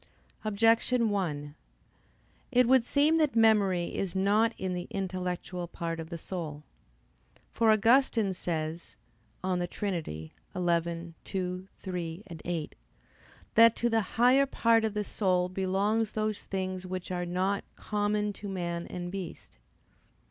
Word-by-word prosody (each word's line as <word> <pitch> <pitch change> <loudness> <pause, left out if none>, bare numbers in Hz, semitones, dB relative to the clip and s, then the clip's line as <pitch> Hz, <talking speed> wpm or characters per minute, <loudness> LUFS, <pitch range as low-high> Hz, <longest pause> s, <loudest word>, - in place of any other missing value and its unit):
Objection 225 +2 +3
1: 150 -7 -2 1.0
It 250 -1 +4
would 260 -1 +5
seem 295 +6 +3
that 300 -6 +2
memory 205 -6 +3
is 195 -2 -2
not 205 +4 +3
in 185 -1 -2
the 180 0 -4
intellectual 180 -2 -3
part 165 -1 -4
of 160 0 -6
the 170 - -5
soul. 155 -4 -6 0.9
For 225 -1 +2
Augustine 225 -1 +4
says 165 -2 -4 0.5
(De 180 -1 0
Trin. 185 -2 -2
xii, 80 - -8 0.2
2,3,8) 175 0 -3 0.8
that 230 0 +7
to 240 - +1
the 225 0 +3
higher 250 +6 +4
part 230 -3 +3
of 220 -2 -1
the 210 - 0
soul 185 -3 +1
belongs 195 +4 0
those 215 -1 -2
things 185 -1 -3
which 185 0 -5
are 175 -1 -1
not 190 +3 0
"common 210 0 -1
to 205 +1 -7
man 170 -2 -3
and 175 0 -5
beast." 190 - -7
190 Hz, 125 wpm, -29 LUFS, 175-215 Hz, 1.0 s, that